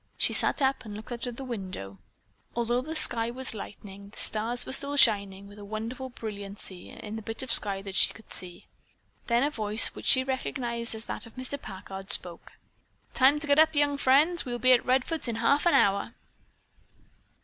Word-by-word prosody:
She - - +2
sat 285 - +3
up 265 0 0
and 210 -3 -9
looked 215 +3 -10
out 240 +1 -5
of 245 - -6
the 270 - -8
window. 185 - -7 0.6
Although 240 +1 0
the 310 +4 -7
sky 235 -6 +1
was 255 +1 +2
lightening, 200 -1 -10
the - - -17
stars 230 +3 +1
were 260 - -5
still 280 +1 +1
shining 200 -5 +3
with 205 +1 -14
a - - -10
wonderful 225 +5 -6
brilliancy 200 -5 -7
in 215 +1 -8
the - - -6
bit 225 +4 -6
of 260 - -4
sky 195 -3 -1
that 195 -1 -7
she - - +5
could 220 - -9
see. 180 -1 -3 0.6
Then 235 +1 +2
a 290 - 0
voice, 215 -3 +5
which - - -8
she 260 - +6
recognized 240 -3 -3
as 220 +1 -9
that - - -6
of 230 - -18
Mr. 260 +2 -6
Packard, 195 0 -9
spoke. 175 -4 -3 0.6
"Time 275 +3 +4
to - - -4
get 285 +1 +3
up, 315 0 +4
young 290 0 +2
friends. 290 +6 +3
We'll 245 -1 -4
be 255 +2 +4
at 245 - +3
Redfords 260 +4 0
in 235 - -3
half 280 +8 +2
an 345 - +4
hour." 200 +3 +2
235 Hz, 200 wpm, -27 LUFS, 205-260 Hz, 0.6 s, she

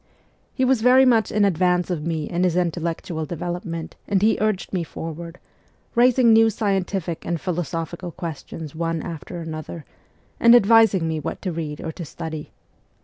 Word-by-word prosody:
He 260 - 0
was 260 -3 +2
very 255 +2 +6
much 230 -5 +3
in 210 -1 +3
advance 180 -1 +1
of 160 -4 -2
me 160 -3 -2
in 175 +1 -1
his 180 -2 +2
intellectual 170 -2 -2
development 170 0 -5
and 200 -1 +2
he 215 +3 +3
urged 210 -4 -1
me 180 -3 0
forward, 165 +1 -7 0.6
raising 245 -1 +5
new 225 0 +6
scientific 195 -5 -2
and 170 0 -2
philosophical 170 0 -4
questions 160 -3 -7
one 165 -1 -2
after 170 +1 -7
another, 160 0 -7 0.5
and 235 +1 +7
advising 220 -6 +5
me 160 -1 -1
what 150 - -5
to 185 - -1
read 155 -3 -5
or 160 - -4
to 170 - -8
study. 160 0 -7
175 Hz, 160 wpm, -23 LUFS, 165-205 Hz, 0.6 s, and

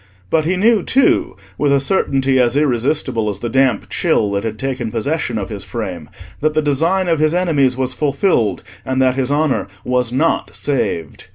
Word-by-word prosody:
But 155 -1 +2
he 180 +3 +1
knew 215 +2 +3
too, 265 +8 +2 0.2
with 145 -1 +2
a 140 - +4
certainty 135 -4 +1
as 125 +1 +2
irresistible 125 -4 0
as 100 - -4
the 120 +4 -4
damp 130 -3 +1
chill 105 - 0
that 100 0 -1
had 110 -1 -4
taken 130 -1 -3
possession 120 +2 -2
of 100 -3 -4
his 100 -3 -6
frame, 90 -9 -6 0.3
that 155 +1 0
the 155 - +3
design 165 +6 +1
of 165 -3 +1
his 155 +2 +2
enemies 145 -8 +2
was 130 -1 -1
fulfilled, 140 - 0 0.2
and 130 0 -2
that 130 -1 +3
his 130 -1 -1
honour 145 -9 +1 0.2
was 125 -1 0
not 150 +6 0
saved. 85 - -2
135 Hz, 185 wpm, -18 LUFS, 115-155 Hz, 0.3 s, a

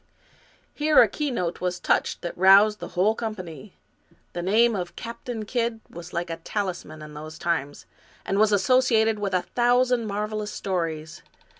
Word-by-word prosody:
Here 305 0 +4
a - - +7
keynote 240 - -3
was 180 0 -2
touched - - 0
that 175 - -4
roused 200 +3 +6
the - - -6
whole 200 +5 +4
com 225 -1 -4
pany. 185 +1 -10 0.6
The 175 - -3
name 220 +5 +3
of 180 -2 -5
Captain 230 -1 -6
Kidd 235 0 -1
was 170 +1 -10
like 170 0 -3
a 165 - -4
talisman 175 -4 -5
in 150 0 -10
those 155 +1 -9
times, 155 -5 -2 0.4
and 195 - 0
was 215 0 +4
associated 225 +1 +3
with 195 -2 -1
a 180 - +1
thousand 245 -1 +2
marvelous 210 +1 -3
stories. 165 -5 -3
200 Hz, 160 wpm, -25 LUFS, 175-225 Hz, 0.6 s, a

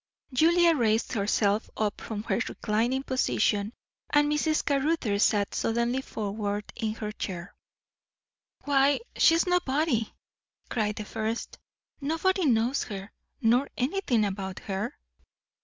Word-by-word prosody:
Julia 340 +4 +5
raised 225 -3 +1
herself 205 -1 +1
up 210 -2 -1
from 210 -2 -5
her 230 - 0
reclining 235 +5 0
position, 215 -5 +1 0.4
and 295 0 +3
Mrs. 305 +1 +1
Caruthers 275 -7 +1
sat 205 -2 +2
suddenly 235 +3 0
forward 205 -3 -3
in 220 -1 -2
her 215 -2 -4
chair. 180 -4 -6 1.1
"Why, 280 +2 +3
she 325 - +5
is 330 - +2
nobody!" 300 - +1 0.6
cried 210 -3 0
the 215 - -5
first. 220 +2 -4 0.4
"Nobody 325 +4 +1
knows 240 +2 +2
her, 195 -1 -7 0.3
nor 245 +5 +3
anything 255 - +1
about 190 -1 -4
her." 205 +6 -4
230 Hz, 120 wpm, -28 LUFS, 210-285 Hz, 1.1 s, Julia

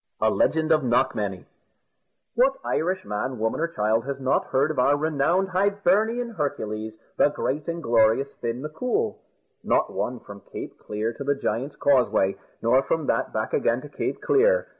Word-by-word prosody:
A - - +3
LEGEND 160 0 +1
OF 155 -2 +4
KNOCKMANY 105 -6 0 0.9
What 260 +3 +4
Irish 185 +3 -1
man, 125 +5 -3
woman, 110 +4 -1
or 165 - +1
child 110 -6 0
has 140 -1 -3
not 130 0 +1
heard 140 +4 +1
of 155 - -3
our 140 +3 +4
renowned 160 +5 +1
Hibernian 205 +5 +1
Hercules, 110 - -3 0.2
the - - +5
great 145 0 -3
and 170 0 -3
glorious 115 +4 +3
Fin 120 +3 -4
M'Coul? 250 - -2 0.4
Not - - +1
one, 125 0 -2
from 100 0 -12
Cape - - -7
Clear 110 +2 -3
to 140 - -7
the 140 +1 +1
Giant's 135 +2 -3
Causeway, 125 -8 +2 0.3
nor 125 +3 +4
from 160 +3 -1
that - - 0
back - - -3
again 460 - +2
to - - -10
Cape - - -3
Clear. - - +3
140 Hz, 165 wpm, -25 LUFS, 115-175 Hz, 0.9 s, the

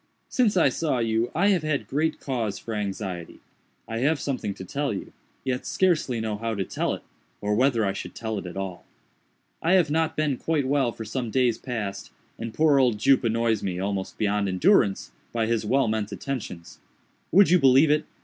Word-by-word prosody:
Since 225 -6 +2
I 160 -5 +5
saw 150 0 -1
you 115 0 0
I 195 +5 +3
have 190 -5 +3
had 155 -2 -1
great 155 +3 0
cause 115 -7 -2
for 115 - -6
anxiety. 95 -4 -4 0.5
I 115 0 -3
have 145 +4 +2
something 125 -8 -3
to 95 - -8
tell 140 +8 -2
you, 100 - -6 0.3
yet 130 -1 -2
scarcely 155 -10 +1
know 110 -2 -2
how 115 +1 -2
to 100 - -1
tell - - -2
it, - - -13 0.4
or 105 0 -1
whether 120 -1 +3
I 95 - 0
should - - -7
tell 110 -2 -3
it 95 - -8
at 90 - -8
all. 95 -2 -5 0.8
"I 170 +3 +2
have 175 -6 +4
not 160 +1 +1
been 150 -4 +1
quite 150 -3 0
well 135 -3 +2
for 115 - -8
some 120 +2 -3
days 125 -1 +2
past, 110 -6 -4 0.3
and 115 0 -4
poor 150 +2 +4
old 125 -5 +3
Jup 130 +5 +4
annoys 115 -1 +1
me, 90 -2 -3
almost 95 0 -3
beyond 105 -1 +1
endurance, 95 -2 +3 0.2
by 115 -1 +1
his 110 -1 -1
well 135 +1 +3
meant 110 -1 -1
attentions. 105 -9 -6 0.5
Would 195 +1 +6
you 180 - +6
believe 135 +2 +6
it? 150 0 +2
115 Hz, 195 wpm, -25 LUFS, 105-145 Hz, 0.8 s, Would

